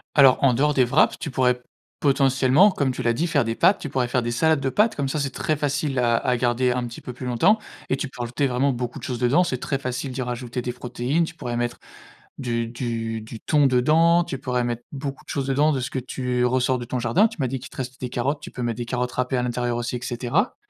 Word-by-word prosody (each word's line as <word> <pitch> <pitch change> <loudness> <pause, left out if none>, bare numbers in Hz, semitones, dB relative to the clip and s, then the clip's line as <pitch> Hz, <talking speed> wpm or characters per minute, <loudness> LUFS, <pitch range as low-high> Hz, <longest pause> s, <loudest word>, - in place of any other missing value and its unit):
Alors, 135 -3 +7
en 135 -2 +5
dehors 150 +5 +2
des 130 - +4
wraps, 130 +6 +3
tu 150 - -4
pourrais 125 -1 +1 0.4
potentiellement, 135 +5 +4
comme 140 -8 0
tu 130 - -5
l'as 115 -1 +2
dit, 160 +9 0
faire 150 - +2
des 115 0 -2
pâtes. 185 - +4
Tu - - -5
pourrais 130 -2 -1
faire 125 +1 +1
des 120 0 -2
salades 160 +5 +2
de 135 -1 -1
pâtes, 215 - +2
comme 140 -2 0
ça, 140 +3 -2
c'est 140 - -1
très 155 +4 -1
facile 145 -2 -1
à 120 -1 +3
à 125 +1 +1
garder 125 +1 +1
un 125 0 -1
petit 115 -1 -8
peu 125 - -8
plus 125 +1 -8
longtemps 125 - +3 0.3
et - - +2
tu 140 +1 -4
peux 130 - -15
rajouter 120 +4 -1
vraiment 130 +2 +1
beaucoup 120 -1 -4
de - - -15
choses 125 -2 -3
dedans. 130 +9 +3
C'est 130 -7 -2
très 140 - -2
facile 130 +1 -4
d'y 130 +1 -4
rajouter 125 0 -4
des 125 0 -4
protéines. 125 +5 -1
Tu 165 - -4
pourrais 120 -7 -4
mettre 120 0 -2 0.6
du 115 -2 -1
du 115 -2 -3
du 110 +1 -9
thon 145 -2 +3
dedans. 160 +7 +4
Tu 135 - -5
pourrais 125 -1 -1
mettre 120 0 -3
beaucoup 140 -1 -6
de - - -37
choses 135 -2 -2
dedans 145 +3 +3
de 135 - -1
ce 130 +1 -4
que - - -3
tu 125 -1 -2
ressors 130 +1 +1
de 120 - -6
ton 125 - -2
jardin. 120 - +3
Tu - - -12
m'as 130 - +1
dit 135 +2 -3
qu'il 130 - -10
te - - -16
restait 130 0 -5
des 125 - -3
carottes. 135 +5 -1
Tu - - -9
peux 125 - -6
mettre 120 -1 -2
des 120 - -4
carottes 125 0 -2
râpées 125 +1 -1
à 125 - 0
l'intérieur 120 0 -1
aussi 120 +1 -3
et - - -5
cetera. 125 - -1
125 Hz, 270 wpm, -23 LUFS, 120-140 Hz, 0.6 s, Alors